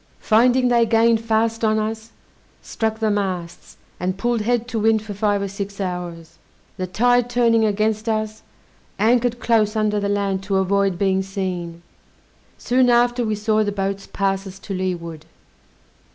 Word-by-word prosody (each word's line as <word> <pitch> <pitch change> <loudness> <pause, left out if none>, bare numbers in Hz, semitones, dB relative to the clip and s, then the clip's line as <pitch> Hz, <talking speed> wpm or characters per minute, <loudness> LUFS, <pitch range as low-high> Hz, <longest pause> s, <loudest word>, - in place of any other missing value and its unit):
Finding 245 +3 +3
they 240 -1 +4
gained 225 0 +3
fast 225 0 0
on 215 0 +2
us, 220 +1 -3 0.5
struck 220 -1 -2
the 220 -1 0
masts, 185 -4 -4 0.2
and 185 +1 -2
pulled 235 +2 0
head 240 +1 0
to 230 - -2
wind 220 0 +2
for 210 -1 -6
five 205 0 0
or - - -2
six 200 +1 -6
hours. 175 -3 -5 0.4
The 185 - -3
tide 245 +6 +2
turning 230 -2 +3
against 215 +1 0
us, 215 -1 -2 0.6
anchored 240 +3 +2
close 220 -2 +2
under 210 -1 +1
the 200 0 -2
land 200 -2 -1
to 200 -1 -1
avoid 195 -1 +1
being 190 0 +1
seen. 180 -3 -5 0.7
Soon 250 0 +2
after 240 0 +3
we 215 -2 -1
saw 215 +1 +1
the 205 - -1
boats 195 0 -3
pass 195 0 -1
us 190 0 -10
to 195 +1 -7
leeward. 170 -4 -4
210 Hz, 160 wpm, -21 LUFS, 195-225 Hz, 0.7 s, they